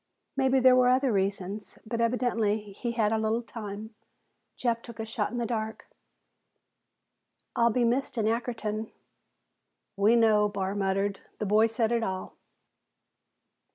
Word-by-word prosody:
Maybe 265 Hz, -1 st, +3 dB
there 255 Hz, 0 st, +6 dB
were 250 Hz, -1 st, +5 dB
other 260 Hz, 0 st, +3 dB
reasons, 195 Hz, +1 st, -2 dB
but 230 Hz, +1 st, -2 dB
evidently 230 Hz, -3 st, +1 dB, 0.2 s
he 235 Hz, +4 st, -3 dB
had 220 Hz, -3 st, +1 dB
a 220 Hz, -, +1 dB
little 220 Hz, +2 st, 0 dB
time. 215 Hz, -1 st, -7 dB, 0.6 s
Jeff 235 Hz, -2 st, 0 dB
took 235 Hz, -1 st, -11 dB
a 220 Hz, -, -2 dB
shot 220 Hz, -1 st, -2 dB
in 245 Hz, -, -4 dB
the 240 Hz, -, -1 dB
dark. 220 Hz, -2 st, -3 dB, 1.7 s
"I'll 235 Hz, 0 st, +4 dB
be 245 Hz, +2 st, +1 dB
missed 250 Hz, +2 st, 0 dB
in 220 Hz, -, +1 dB
Ackerton." 220 Hz, -1 st, -2 dB, 1.0 s
"We 205 Hz, +4 st, +4 dB
know," 215 Hz, -3 st, +4 dB
Barr 195 Hz, -1 st, -2 dB
muttered. 195 Hz, 0 st, 0 dB, 0.2 s
"The 215 Hz, -, -3 dB
boy 215 Hz, +3 st, +4 dB
said 225 Hz, 0 st, 0 dB
it 235 Hz, -1 st, +2 dB
all." 190 Hz, -4 st, -4 dB
225 Hz, 145 wpm, -28 LUFS, 210-235 Hz, 1.7 s, there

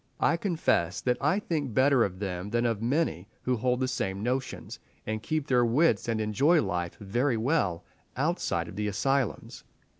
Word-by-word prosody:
I -, -, +3 dB
confess 165 Hz, -, 0 dB
that 125 Hz, -1 st, 0 dB
I 150 Hz, +7 st, +2 dB
think 150 Hz, -, -2 dB
better 130 Hz, -2 st, +5 dB
of 95 Hz, -3 st, -3 dB
them 95 Hz, -1 st, -4 dB
than 120 Hz, +2 st, 0 dB
of 115 Hz, -3 st, 0 dB
many 120 Hz, -, 0 dB, 0.2 s
who 125 Hz, -, +1 dB
hold 125 Hz, +2 st, 0 dB
the 130 Hz, -, +1 dB
same 100 Hz, -6 st, -2 dB
notions, 130 Hz, +2 st, -3 dB, 0.3 s
and 110 Hz, 0 st, -3 dB
keep 155 Hz, +4 st, -2 dB
their 125 Hz, -4 st, +3 dB
wits 120 Hz, -1 st, +2 dB
and 115 Hz, -1 st, 0 dB
enjoy 135 Hz, -, +3 dB
life 90 Hz, -, -2 dB
very 120 Hz, +5 st, 0 dB
well, 110 Hz, -, 0 dB, 0.3 s
outside 135 Hz, -, 0 dB
of 90 Hz, -, -9 dB
the 105 Hz, +1 st, -2 dB
asylums. 130 Hz, +4 st, -1 dB
120 Hz, 175 wpm, -28 LUFS, 100-140 Hz, 0.3 s, better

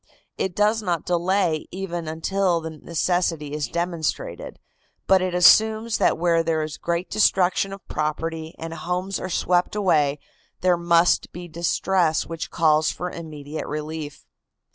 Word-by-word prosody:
It 185 Hz, -2 st, -2 dB
does 210 Hz, +2 st, +2 dB
not 175 Hz, -6 st, -2 dB
delay 175 Hz, -2 st, +1 dB
even 175 Hz, -3 st, -5 dB
until 175 Hz, +3 st, 0 dB
the 160 Hz, 0 st, -6 dB
necessity 165 Hz, -1 st, -1 dB
is 150 Hz, -1 st, -2 dB
demonstrated, 170 Hz, -, -3 dB, 0.5 s
but 190 Hz, -1 st, +4 dB
it 185 Hz, -1 st, -1 dB
assumes 220 Hz, +5 st, +5 dB
that -, -, +3 dB
where 170 Hz, 0 st, +2 dB
there 160 Hz, -1 st, 0 dB
is 155 Hz, -1 st, -6 dB
great 170 Hz, +1 st, -2 dB
destruction 195 Hz, -2 st, +2 dB
of 195 Hz, -1 st, -10 dB
property 160 Hz, +1 st, -3 dB
and 165 Hz, 0 st, -6 dB
homes 180 Hz, +3 st, -3 dB
are 185 Hz, -, -5 dB
swept 180 Hz, +2 st, +1 dB
away 150 Hz, -8 st, +2 dB, 0.4 s
there 180 Hz, -1 st, +4 dB
must 170 Hz, 0 st, +3 dB
be 175 Hz, 0 st, -8 dB
distress 170 Hz, 0 st, +1 dB
which 165 Hz, 0 st, -6 dB
calls 155 Hz, -2 st, +3 dB
for 180 Hz, 0 st, -4 dB
immediate 155 Hz, -2 st, -7 dB
relief. 150 Hz, -1 st, -6 dB
170 Hz, 140 wpm, -23 LUFS, 160-185 Hz, 0.5 s, assumes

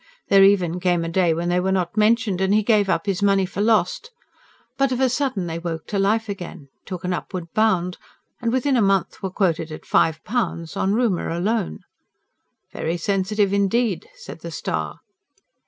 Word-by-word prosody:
There 195 Hz, -1 st, +7 dB
even 180 Hz, -3 st, +3 dB
came 175 Hz, -2 st, +1 dB
a -, -, -3 dB
day 175 Hz, 0 st, +2 dB
when 170 Hz, +2 st, -1 dB
they 175 Hz, 0 st, +2 dB
were 190 Hz, +1 st, 0 dB
not 185 Hz, -1 st, -1 dB
mentioned; 215 Hz, -3 st, +2 dB
and 190 Hz, +2 st, +3 dB
he 215 Hz, -, +3 dB
gave 205 Hz, -2 st, +3 dB
up 165 Hz, -, 0 dB
his 195 Hz, -1 st, -1 dB
money 195 Hz, -1 st, +3 dB
for 195 Hz, +2 st, -4 dB
lost. 220 Hz, -, +1 dB, 0.7 s
But 275 Hz, -1 st, +1 dB
of 255 Hz, -, -1 dB
a 260 Hz, -1 st, +3 dB
sudden 255 Hz, -7 st, -1 dB
they 165 Hz, 0 st, -4 dB
woke 165 Hz, -2 st, -5 dB
to 200 Hz, -, -1 dB
life 220 Hz, +3 st, +1 dB
again, 175 Hz, -8 st, -7 dB, 0.2 s
took 180 Hz, -2 st, -6 dB
an 180 Hz, 0 st, -1 dB
upward 175 Hz, -2 st, -6 dB
bound, 185 Hz, -5 st, +1 dB, 0.4 s
and 235 Hz, -1 st, 0 dB
within 260 Hz, +2 st, +1 dB
a 240 Hz, -, +3 dB
month 195 Hz, -2 st, +1 dB
were 190 Hz, -, -2 dB
quoted 170 Hz, -4 st, 0 dB
at 155 Hz, -, -9 dB
five 160 Hz, -1 st, +2 dB
pounds 185 Hz, -8 st, -2 dB
on 195 Hz, +2 st, +1 dB
rumour 225 Hz, -7 st, 0 dB
alone. 175 Hz, -, -1 dB, 0.9 s
"Very 165 Hz, +2 st, -2 dB
sensitive 200 Hz, +2 st, 0 dB
indeed," 200 Hz, 0 st, +1 dB
said -, -, -10 dB
the 170 Hz, -, -7 dB
STAR. 80 Hz, -, -4 dB
190 Hz, 190 wpm, -22 LUFS, 175-215 Hz, 0.9 s, There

